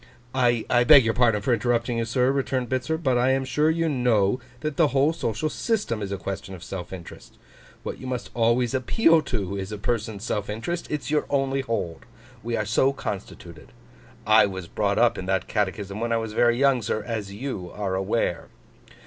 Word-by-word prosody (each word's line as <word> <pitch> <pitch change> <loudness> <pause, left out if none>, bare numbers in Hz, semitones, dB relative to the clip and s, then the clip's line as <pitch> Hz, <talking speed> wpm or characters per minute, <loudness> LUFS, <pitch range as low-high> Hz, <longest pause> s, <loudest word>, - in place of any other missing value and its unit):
'I 120 -1 +2
beg 140 -5 +8
your 115 - +2
pardon 115 -4 +2
for 125 - +2
interrupting 120 +1 0
you, 115 - 0
sir,' 125 +3 +2
returned 130 -3 -1
Bitzer; 130 +5 -1
'but 130 -6 +1
I 125 +2 +3
am 135 0 0
sure 150 +4 +2
you 165 +1 +1
know 125 -6 +2 0.2
that 155 -2 -3
the 160 0 +4
whole 140 +3 +2
social 115 -2 -2
system 195 - -1
is 100 -1 -4
a 100 - -2
question 95 0 -6
of 90 - -12
self 90 -3 -7
interest. 90 -3 -11 0.5
What - - -5
you 130 - -7
must 125 -1 -4
always 115 +1 +2
appeal 165 - +3
to, 100 -9 -3
is 95 +1 -5
a 105 - -4
person's 105 -1 -2
self 105 -3 -2
interest. 140 +12 -4
It's 150 -1 -3
your 150 - +1
only 135 -1 +1
hold. 105 -10 -4 0.3
We 115 +1 -2
are 105 - -1
so 125 +6 +3
constituted. 90 - -7 0.5
I 110 -1 +6
was 95 -3 -6
brought 100 +3 -1
up 120 +1 +3
in 95 - -6
that 95 -1 0
catechism 100 0 -2
when 115 +1 -2
I 115 - +3
was 110 -1 -4
very 120 +1 +3
young, 135 -2 +3
sir, 110 0 -2
as 105 -3 -4
you 100 -5 -5
are 100 -2 -3
aware. 95 -1 -1
115 Hz, 200 wpm, -25 LUFS, 100-130 Hz, 0.5 s, beg